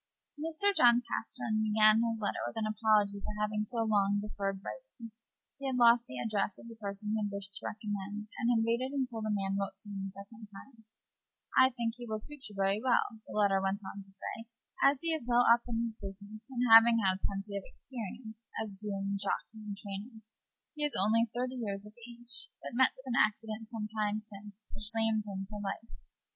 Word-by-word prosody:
Mr. 325 +6 0
John 240 -7 +6
Pastern 220 -1 -2
began 215 0 +5
his 230 -1 0
letter 205 - -1
with - - -11
an 220 - 0
apology 215 -2 +2
for 210 - -5
having 210 0 0
so 225 +2 -1
long 205 -2 +3
deferred 200 -2 -3
writing. 270 - -9 0.5
He 275 - -2
had 255 - -1
lost 235 0 +6
the 125 - -6
address 205 - -1
of - - -12
the 230 - -8
person 205 +1 -3
he 220 - 0
had 205 - -1
wished 200 -1 -6
to - - -3
recommend, 210 0 -5
and 235 - +2
had 225 -2 +3
waited 255 +4 0
until 250 -4 -2
the 215 - -2
man 195 -1 0
wrote 195 -1 -4
to 205 - -8
him. 195 0 -4 1.5
"I 260 0 +7
think 235 -2 -2
he 240 - -6
will 215 - -1
suit 280 +3 -5
you 205 - -12
very 195 +2 +2
well," 240 -3 +1
the - - -5
letter 200 -2 +4
went 195 +1 -1
on 200 +1 -6
to 195 - -16
say, 225 +4 -7 0.3
"as 275 -1 +5
he 330 -1 +1
is 315 - -1
well 245 0 +5
up 235 +1 +6
in 230 0 0
his 225 -1 -7
business, 205 +4 -9
having 235 -2 +7
had 190 +1 +2
plenty 200 +1 -3
of 200 - -1
experience 220 -1 -8 0.2
as 205 -3 -5
groom, 200 -1 -2
jockey, 220 +2 -2
and 205 -1 -6
trainer. 210 +2 -7 0.5
He 300 -2 -4
is 295 - 0
only 225 +4 +4
thirty 250 +2 -3
years 200 -2 -3
of 210 - -12 0.2
age, 240 - -3
but - - -8
met 260 +2 +4
with 260 - -14
an 245 -2 +3
accident 215 +1 -1
some 225 -3 -4
time 215 -1 -1
since, 210 0 -13
which 210 0 -1
lamed 220 -2 +2
him 195 0 -4
for 210 +1 -7
life. 205 +3 -5
215 Hz, 205 wpm, -32 LUFS, 200-235 Hz, 1.5 s, I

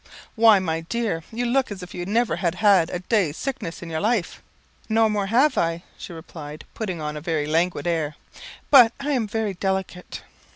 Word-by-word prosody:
"Why, 225 -2 +6
my 165 -4 -1
dear, 210 -1 -2
you 240 +2 -2
look 255 0 +1
as 190 -3 -6
if 180 - -10
you 175 0 -5
never 225 -3 +1
had 170 0 -1
had 195 -5 +4
a 180 - -3
day's 185 -6 0
sickness 260 -12 -5
in 170 - -7
your 160 - -2
life." 215 -4 -1 0.5
"No 225 0 +4
more 210 -2 -1
I - - -5
have," 200 - +2
she - - -9
replied, 155 -2 -9
putting 190 -7 -4
on 150 0 -4
a 150 - -6
very 160 -2 -1
languid 160 0 0
air, 160 -3 -1 0.6
"but 245 -5 +8
I 285 +2 -2
am 245 -6 0
very 215 -1 -2
delicate." 190 -1 -4
190 Hz, 195 wpm, -23 LUFS, 165-225 Hz, 0.6 s, but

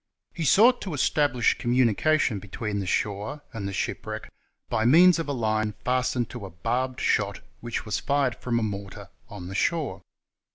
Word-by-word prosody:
He 165 - -3
sought 235 - +5
to 180 -6 -4
establish 140 -3 +2
communi 120 -2 +2
cation 155 -8 +2
between 100 +1 -4
the 95 - -4
shore 105 +10 -2
and 105 -3 -4
the - - -4
shipwreck 95 - -4 0.4
by 110 -1 0
means 170 +8 +6
of 165 - -3
a - - -2
line 110 -4 -1
fastened 125 -1 0
to 120 -4 -7
a - - -10
barbed 125 +9 -2
shot 100 -1 0 0.2
which 120 -1 -4
was 105 - -1
fired 140 -3 +1
from 120 0 -2
a 115 - 0
mortar 100 -2 -6 0.2
on 100 -5 -8
the 95 - -7
shore. 160 +8 -1
120 Hz, 175 wpm, -26 LUFS, 105-140 Hz, 0.4 s, means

